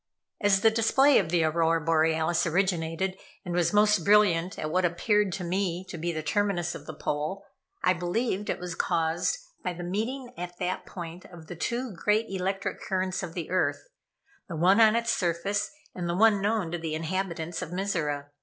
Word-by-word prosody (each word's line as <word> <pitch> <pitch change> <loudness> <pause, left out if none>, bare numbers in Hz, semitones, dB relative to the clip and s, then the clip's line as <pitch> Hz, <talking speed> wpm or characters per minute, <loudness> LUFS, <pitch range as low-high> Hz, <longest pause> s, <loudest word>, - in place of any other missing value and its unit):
As 195 -2 +4
the 225 - +5
display 260 +5 +4
of 175 - -1
the 170 -1 +2
Aurora 165 +1 +2
Borealis 160 +1 +2
originated, 180 +1 0 0.3
and 175 - -3
was 175 -1 +2
most 210 0 +4
brilliant 190 -4 +4
at 155 - -3
what 185 +2 +2
appeared 195 +4 +2
to 185 - -4
me 180 0 -1
to - - -6
be 170 +2 -1
the 155 -1 -4
terminus 175 0 0
of 150 - -10
the 155 - -5
pole, 155 +8 -3 0.4
I 180 - +4
believed 190 +4 -2
it - - 0
was 180 -1 -5
caused 165 - 0 0.3
by 180 - -2
the 175 +1 -7
meeting 240 +8 -3
at 175 0 -6
that 180 +1 -3
point 175 0 -8
of 170 -3 -12
the 175 - -8
two 240 +7 -2
great 210 +5 +1
electric 195 +1 -2
currents 185 -1 -1
of 175 -3 -6
the 170 -2 -5
earth, 185 - 0 0.6
the 170 - -4
one 185 +7 +4
on 220 0 +6
its 235 0 +1
surface, 195 +3 0 0.2
and 175 -1 -4
the 170 - -1
one 215 -1 +5
known 205 -4 0
to 175 - -3
the 160 -1 -3
inhabitants 170 0 -3
of 180 - -5
Mizora. 155 -7 -2
180 Hz, 190 wpm, -27 LUFS, 165-200 Hz, 0.6 s, on